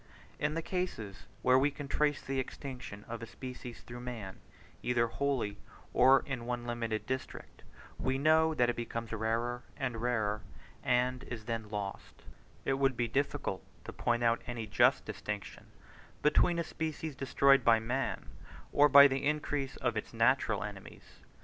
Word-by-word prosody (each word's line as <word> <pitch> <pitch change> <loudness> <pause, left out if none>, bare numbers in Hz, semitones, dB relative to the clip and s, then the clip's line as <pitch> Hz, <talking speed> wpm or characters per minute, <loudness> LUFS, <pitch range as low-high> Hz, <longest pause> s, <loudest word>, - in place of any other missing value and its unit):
In 150 +1 0
the 165 - -2
cases 135 - -4 0.2
where 130 +1 +6
we 140 +2 +3
can 145 0 -7
trace 145 0 +1
the 135 0 -2
extinction 125 -6 -6
of 115 -1 -6
a 115 - -6
species 125 +3 -8
through 120 0 -9
man, 115 -6 -6 0.4
either 120 -1 +2
wholly 115 -5 -1 0.3
or 130 +1 +6
in 125 -4 -4
one 120 -1 -2
limited 115 -2 -2
district, 130 0 -5 0.4
we 130 0 0
know 160 +2 +4
that 120 -3 +3
it 120 - 0
becomes 115 -1 -4
rarer 115 +3 -1 0.2
and 125 -5 -3
rarer, 110 -4 0 0.4
and 125 +1 +1
is 115 -3 -7
then 115 -2 -3
lost: 105 -2 -6 0.4
it 135 0 +1
would 135 -2 +2
be 120 - +1
difficult 135 -5 -1 0.2
to - - -7
point 120 0 0
out 115 0 +3
any 120 -2 -4
just 105 - +3
distinction 105 -1 -6 0.6
between 170 +3 +4
a 170 - +1
species 160 -1 -4
destroyed 135 0 +4
by 115 -1 +6
man 125 +4 -2 0.5
or 145 +1 +6
by 140 +1 +10
the 135 0 -2
increase 145 -2 -1
of - - -1
its - - -4
natural - - +3
enemies. - - -10
125 Hz, 160 wpm, -32 LUFS, 115-140 Hz, 0.6 s, by